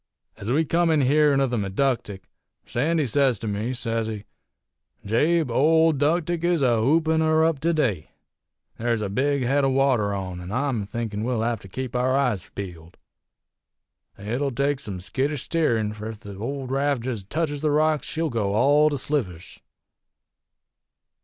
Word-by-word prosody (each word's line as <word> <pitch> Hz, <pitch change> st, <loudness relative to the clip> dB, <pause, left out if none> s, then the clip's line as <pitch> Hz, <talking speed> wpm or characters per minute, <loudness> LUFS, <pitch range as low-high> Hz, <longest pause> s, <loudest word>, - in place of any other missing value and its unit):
"Ez 100 Hz, -, -7 dB
we 155 Hz, +5 st, +2 dB
come 170 Hz, +2 st, +2 dB
in 155 Hz, -2 st, +3 dB
hearin' 145 Hz, +1 st, +3 dB
of 135 Hz, -2 st, +1 dB
the 120 Hz, -, 0 dB
Meductic, 100 Hz, 0 st, -1 dB, 0.4 s
Sandy 155 Hz, +5 st, 0 dB
sez 130 Hz, -1 st, +2 dB
to 110 Hz, -, -6 dB
me, 105 Hz, +4 st, -2 dB
sez 115 Hz, -3 st, -2 dB
he: 105 Hz, -2 st, -5 dB, 0.8 s
'Jabe, 150 Hz, +7 st, +2 dB
old 160 Hz, +2 st, +4 dB
'Ductic 165 Hz, +3 st, 0 dB
is 170 Hz, -4 st, +2 dB
a 120 Hz, -3 st, +3 dB
hoopin' 160 Hz, +5 st, +2 dB
her 160 Hz, 0 st, +3 dB
up 160 Hz, -3 st, +1 dB
to 165 Hz, +4 st, +1 dB
day. 115 Hz, -, -1 dB, 0.7 s
There's 115 Hz, -1 st, 0 dB
a 100 Hz, -, -2 dB
big 140 Hz, +6 st, 0 dB
head 140 Hz, +3 st, +2 dB
o' 135 Hz, -, +3 dB
water 130 Hz, -6 st, +2 dB
on, 95 Hz, -3 st, -4 dB
an' 90 Hz, +2 st, -8 dB
I'm 125 Hz, -4 st, -1 dB
thinkin' 110 Hz, -2 st, -4 dB
we'll 120 Hz, -2 st, -1 dB
hev 115 Hz, -1 st, -1 dB
to 95 Hz, -, -13 dB
keep 125 Hz, +5 st, -6 dB
our 130 Hz, +2 st, +2 dB
eyes 125 Hz, -10 st, 0 dB
peeled. 85 Hz, -3 st, -8 dB, 1.2 s
It'll 120 Hz, +8 st, -2 dB
take 140 Hz, +2 st, 0 dB
some 100 Hz, -6 st, -6 dB
skittish 135 Hz, +8 st, -2 dB
steerin', 115 Hz, -11 st, 0 dB
fur 105 Hz, +1 st, -7 dB
ef 110 Hz, -1 st, -9 dB
the 100 Hz, -2 st, -9 dB
old 130 Hz, +5 st, -5 dB
raft 140 Hz, -2 st, 0 dB
jest 110 Hz, -6 st, -5 dB
teches 150 Hz, -3 st, -2 dB
the 155 Hz, -, +1 dB
rocks 155 Hz, 0 st, +1 dB
she'll 160 Hz, -1 st, -2 dB
go 105 Hz, -3 st, -1 dB
all 145 Hz, +6 st, +4 dB
to 145 Hz, -, -2 dB
slivers.' 115 Hz, -, -3 dB
130 Hz, 170 wpm, -24 LUFS, 110-150 Hz, 1.2 s, old